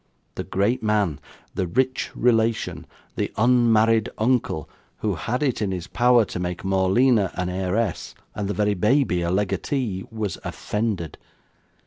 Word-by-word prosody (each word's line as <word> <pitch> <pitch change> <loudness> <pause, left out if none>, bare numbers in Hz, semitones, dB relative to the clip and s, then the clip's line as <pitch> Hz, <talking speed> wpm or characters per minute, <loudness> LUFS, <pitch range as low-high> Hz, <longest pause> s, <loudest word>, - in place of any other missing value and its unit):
The - - -4
great 110 +7 0
man 105 -9 +1 0.3
the 95 - -1
rich 130 +7 0
relation 110 -8 +1 0.3
the - - -1
unmarried 115 -2 +4
uncle 110 - 0 0.3
who 105 -2 0
had 120 - -2
it 130 -6 0
in 100 -2 0
his 90 -2 -4
power 120 +1 +4
to 90 - -6
make 90 0 -4
Morleena 95 +3 +3
an 90 -1 -2
heiress, 95 +3 -2 0.2
and 105 -2 -3
the 100 - -2
very 105 +1 +2
baby 105 -1 +2
a 85 - -1
legatee 100 +2 -1
was 110 -5 -4
offended. 105 -7 -3
105 Hz, 140 wpm, -23 LUFS, 95-115 Hz, 0.3 s, unmarried